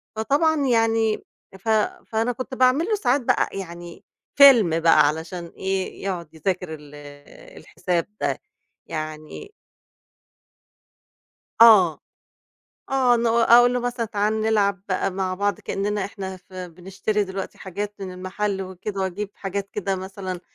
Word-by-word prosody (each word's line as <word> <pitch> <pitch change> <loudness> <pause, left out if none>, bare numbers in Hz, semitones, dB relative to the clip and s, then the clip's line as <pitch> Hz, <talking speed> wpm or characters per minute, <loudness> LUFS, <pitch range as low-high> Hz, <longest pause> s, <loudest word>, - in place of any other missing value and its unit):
فطبعًا 285 +6 +1
يعني 225 -2 +2 0.4
ف 225 - -5 0.4
فأنا 225 +2 0
كنت 255 +2 -7
باعمل 255 +6 +3
له 430 - +1
ساعات 280 -9 +1
بقى - - +1
يعني 175 -2 -8 0.3
فيلم 230 - +7
بقى 155 -3 +5
علشان 165 +3 -4
إيه 190 0 -3
يقعد 175 -5 -4
يذاكر 180 +1 -3
ال 150 -1 -11 0.6
الحساب 175 -2 -3
ده. - - -1 0.5
يعني 155 - -7 2.1
آه. 190 -10 +7 0.9
آه 255 -3 +3
ن 235 - 0
أقول 235 +1 +5
له 250 - 0
مثلًا 245 -1 -2
تعال 215 +1 -1
نلعب 200 -3 +1
بقى 185 +1 0
مع 185 0 -2
بعض 205 +1 -1
كأننا 205 0 -2
إحنا 190 -2 -6
ف 185 +1 -24
بنشتري 185 +3 -3
دلوقتي 190 0 -6
حاجات 200 +2 -5
من 185 -2 -6
المحل 190 +2 -3
وكده، 190 +2 -6
وأجيب 190 +2 -3
حاجات 200 0 -5
كده 195 -2 -2
مثلًا 190 -1 -6
195 Hz, 130 wpm, -23 LUFS, 185-225 Hz, 2.1 s, فيلم